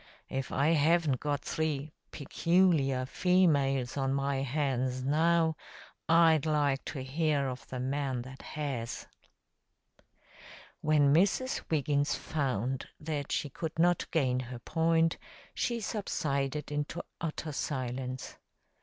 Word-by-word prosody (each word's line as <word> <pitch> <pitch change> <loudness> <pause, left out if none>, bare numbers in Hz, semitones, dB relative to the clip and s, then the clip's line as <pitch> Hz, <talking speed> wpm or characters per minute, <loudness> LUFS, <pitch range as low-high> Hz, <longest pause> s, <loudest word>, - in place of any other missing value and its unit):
If 135 -1 -3
I 140 +3 +2
haven't 160 -3 +3
got 145 -1 -1
three 155 -2 -2 0.2
'peculiar 150 -4 +2
females' 140 -6 +2
on 135 0 +1
my 140 0 0
hands 130 -2 -1
now, 160 +3 +3 0.5
I'd 160 -2 +5
like 145 -3 +1
to 135 -4 -5
hear 145 0 0
of 130 0 -6
the 130 - -5
man 130 -1 -1
that 130 +1 -11
has." 135 -6 -4 1.7
When 145 -2 +4
Mrs. 200 - +2
Wiggins 145 -2 +1
found 130 -4 -2
that 150 -2 -4
she 145 - -1
could 160 +3 -5
not 175 +1 +2
gain 130 -6 +1
her 125 -1 -6
point, 165 +5 +1 0.3
she 235 -1 -1
subsided 150 -10 -2
into 150 +4 -3 0.2
utter 160 -1 -3
silence. 130 -2 -4
145 Hz, 115 wpm, -31 LUFS, 135-160 Hz, 1.7 s, I'd